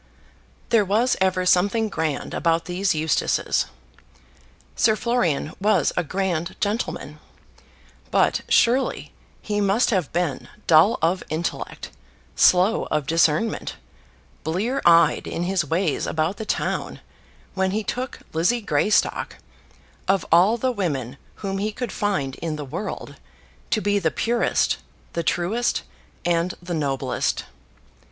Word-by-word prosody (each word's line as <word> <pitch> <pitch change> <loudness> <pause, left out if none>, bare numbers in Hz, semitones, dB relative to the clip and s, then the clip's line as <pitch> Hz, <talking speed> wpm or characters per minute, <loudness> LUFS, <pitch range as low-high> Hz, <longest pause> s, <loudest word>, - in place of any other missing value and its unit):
There 225 -3 +4
was 220 +6 +2
ever 185 -1 +2
something 200 +5 +3
grand 160 -7 -3
about 165 0 +1
these 185 0 0
Eustaces. 155 0 +1 1.1
Sir 220 -1 +3
Florian 185 - 0
was 215 +2 +2
a 175 - +1
grand 175 0 -2
gentleman; 215 +4 -3 0.9
but - - +2
surely 250 +3 +2 0.3
he 205 -1 -1
must 205 +6 +2
have 185 -8 0
been 170 -6 -2 0.2
dull 165 +7 +5
of 180 +3 +2
intellect, 160 +2 -4 0.4
slow 185 +5 +4
of 150 -2 0
discernment, 165 +7 +1 0.7
blear 210 - -1
eyed 170 -2 +5
in 170 - -3
his 185 -1 +1
ways 165 +1 0
about 160 +5 -1
the 220 - -5
town, - - -2 0.5
when 190 0 +1
he 215 +3 -1
took 250 +4 -4
Lizzie 175 +10 +2
Greystock, 205 0 +1 0.7
of 195 -2 +2
all 185 +8 +5
the 255 +2 0
women 140 - -2 0.3
whom 195 0 -2
he 210 +2 -1
could 240 0 -5
find 165 -11 -1
in 165 -2 -3
the 150 -1 -6
world, 130 - -6 0.5
to - - +1
be 205 +1 +1
the 165 -4 +1
purest, 235 +7 +1 0.4
the 170 - -1
truest, 180 +9 0 0.4
and 170 +1 +1
the 175 0 -6
noblest. 140 -5 -1
185 Hz, 125 wpm, -23 LUFS, 165-210 Hz, 1.1 s, dull